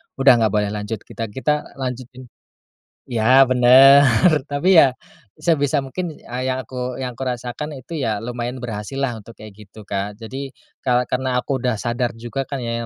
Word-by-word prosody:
udah 135 -3 +5
nggak 110 -1 +1
boleh 105 -1 0
lanjut. 105 0 -5
Kita 115 - -6
kita 150 +7 -2
lanjutin, 130 -1 -6 0.9
ya 125 +3 +4
benar, 130 +3 +7 0.4
tapi 155 +6 +2
ya, 135 -5 +6 0.4
sebisa 145 -4 +1
mungkin 160 +6 -5
yang 130 +1 -3
aku 125 +1 -5
yang 125 -2 -5
aku 135 - -4
rasakan 125 +4 -4
itu 140 +5 -8
ya 110 -7 -2
lumayan 120 +1 -5
berhasil 115 +3 -5
lah 125 -4 -1
untuk 110 +2 -13
kayak 105 -1 -13
gitu 105 +2 -14
Kak. 100 0 -4
Jadi 135 +4 -7 0.3
ka 125 -1 +1
karena 125 -1 0
aku 135 - -2
udah 125 -1 -1
sadar 120 0 -2
juga 120 +4 -5
kan 135 -1 -5
ya 115 0 -3
125 Hz, 170 wpm, -20 LUFS, 115-135 Hz, 0.9 s, benar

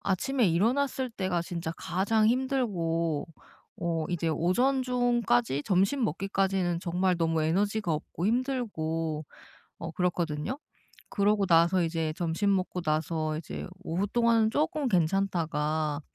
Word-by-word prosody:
아침에 230 +5 +1
일어났을 255 +8 +1
때가 185 -5 -1
진짜 170 -1 -4
가장 215 +4 +1
힘들고 185 - 0 0.5
어 165 -2 -1
이제 170 -2 -1
오전 245 - +2
중까지 240 - +1
점심 195 +8 +2
먹기까지는 190 -1 0
정말 180 +1 0
너무 165 -1 +1
에너지가 200 +3 0
없고 160 +4 -3
힘들고 165 - -1 0.6
어 165 0 -5
그렇거든요. 170 - -1 0.5
그러고 205 0 +2
나서 170 +1 +4
이제 165 -1 -1
점심 175 +4 +1
먹고 185 -1 -2
나서 155 0 -1
이제 155 - -6 0.2
오후 180 +5 -1
동안은 230 0 +3
쪼끔 300 -1 0
괜찮다가 160 -5 0
180 Hz, 280 characters per minute, -28 LUFS, 165-220 Hz, 0.6 s, 나서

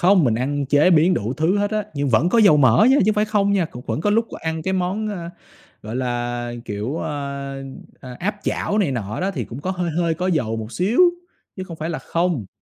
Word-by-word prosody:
Không, 185 -1 +5
mình 120 -4 +2
ăn 140 +4 -1
chế 145 +6 +4
biến 170 +2 +4
đủ 110 +4 -2
thứ 165 +7 +1
hết 205 0 0
á, 215 -1 -1
nhưng 140 -1 -1
vẫn 130 +8 +3
có 230 - +2
dầu 200 -8 +6
mỡ 130 - +5
nha, 270 - +5
chứ - - +4
không 215 - +3
phải 210 0 +2
không 205 -2 +1
nha. 195 -3 +2
Cũng 125 -6 -9
vẫn - - -2
có 205 - +1
lúc 225 +2 +2
g - - -8
ăn 160 0 -4
cái 190 - -1
món, 190 +4 -1
ơ, 175 -5 -5 0.5
gọi 110 +3 -5
là, 120 -1 -2
kiểu, 105 +8 -4
ơ, 140 -1 -5 0.4
ờ, 125 -1 -9
áp 205 +3 -2
chảo 210 - -1
này 190 -9 +2
nọ 110 -4 -4
đó, 190 +2 0
thì 195 - -4
cũng 120 +4 -8
có 185 - -3
hơi 180 -2 -2
hơi 165 0 0
có 180 +3 -3
dầu 130 -11 0
một 110 +1 -6
xíu, 200 - +1 0.6
chứ 185 - -5
không 170 -3 -9
phải 160 +1 -4
là 165 - -3
không. 170 - -1
160 Hz, 250 wpm, -21 LUFS, 130-190 Hz, 0.6 s, dầu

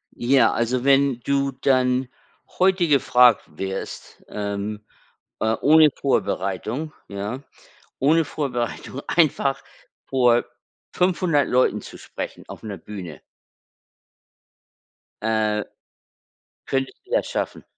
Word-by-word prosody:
Ja, 125 0 +3
also, 120 +2 0
wenn 135 -2 +3
du 140 +1 0
dann 130 -1 +1 0.5
heute 185 -2 +3
gefragt 125 -5 +5
wirst, 95 0 -6
ähm, 105 +1 -4 0.6
äh, 110 0 +1
ohne 155 +1 +7
Vorbereitung, 120 - -2
ja? 100 +6 -5 0.6
Ohne 160 +4 +3
Vorbereitung 130 -1 -4
einfach 140 -4 +1 0.5
vor 120 -3 +3 0.5
500 175 -5 +1
Leuten 125 +1 +2
zu - - -11
sprechen - - -7
auf - - -10
'ner 105 -3 -6
Bühne 90 -5 -9 2.0
äh, 110 -1 +1 1.0
könntest 135 -1 -2
du - - -21
das - - +2
schaffen? - - -4
130 Hz, 100 wpm, -23 LUFS, 110-140 Hz, 2.0 s, ohne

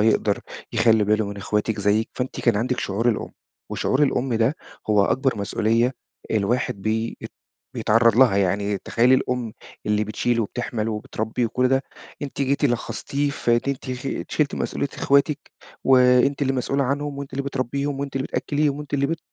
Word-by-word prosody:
يقدر 110 +1 +2 0.3
يخلّي 110 -2 +4
باله 105 +1 +2
من 100 0 -6
إخواتِك 105 +1 -1
زيِك، 105 +3 +2
فأنتِ 125 0 -4
كان 115 -4 +2
عندِك 125 +3 -1
شعور 110 +5 0
الأم. 110 - -1 0.4
وشعور 135 +3 +1
الأم 130 -3 +1
ده 115 +6 +2 0.3
هو 105 -2 +5
أكبر 130 +1 +1
مسؤوليّة 115 +4 +1 0.4
الواحد 105 -1 0
بي 110 +2 -1
ات - - -7 0.4
بيتعرّض 115 0 +3
لها، 125 -6 +6
يعني 100 +1 +1
تخيّلي 120 +6 +3
الأم 125 -3 -1 0.3
اللي 105 0 +2
بتشيل 115 +3 0
وبتحمل 115 0 -2
وبتربي 110 +2 -2
وكُلّ 125 +3 +1
ده، 135 +1 +2 0.4
أنتِ 140 0 -5
جيتِ 140 +2 +1
لخّصتيه 140 +3 -1
في 130 - -2
إن - - +1
أنتِ 130 -1 -3 0.4
شِلتِ 150 -2 +1
مسؤوليّة 140 - -2
إخواتِك، 140 +1 +2 0.5
وأنتِ 130 +2 +5
اللي 135 -1 +2
مسؤولة 135 +2 0
عنهم، 140 +1 -2
وأنتِ 140 -1 -7
اللي 140 - -2
بتربيهم، 140 +1 -2
وأنتِ 140 -1 -4
اللي 135 +1 -1
بتأكّليهم، 145 -1 0
وأنتِ 145 -1 -5
اللي 140 0 +2
بت 165 +2 -2
125 Hz, 165 wpm, -23 LUFS, 110-140 Hz, 0.5 s, لها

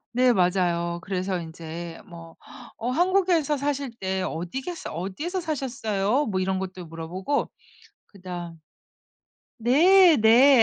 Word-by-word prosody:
네 250 0 +5
맞아요. 175 -3 +1
그래서 185 0 -2
인제 165 +1 -8
뭐 165 -2 -12 0.4
어 235 +2 -3
한국에서 350 -2 +2
사실 280 -1 -2
네 190 0 -2
어디겠어 255 - -5
"어디에서 195 - -4
사셨어요?" 250 - -1
뭐 190 -3 -1
이런 190 0 0
것도 185 -1 -6
물어보고 170 - -3 0.6
그 200 - -18
다음 175 -3 -7 1.0
네. 330 - +6
네. 240 +3 +7
195 Hz, 250 characters per minute, -25 LUFS, 175-280 Hz, 1.0 s, 네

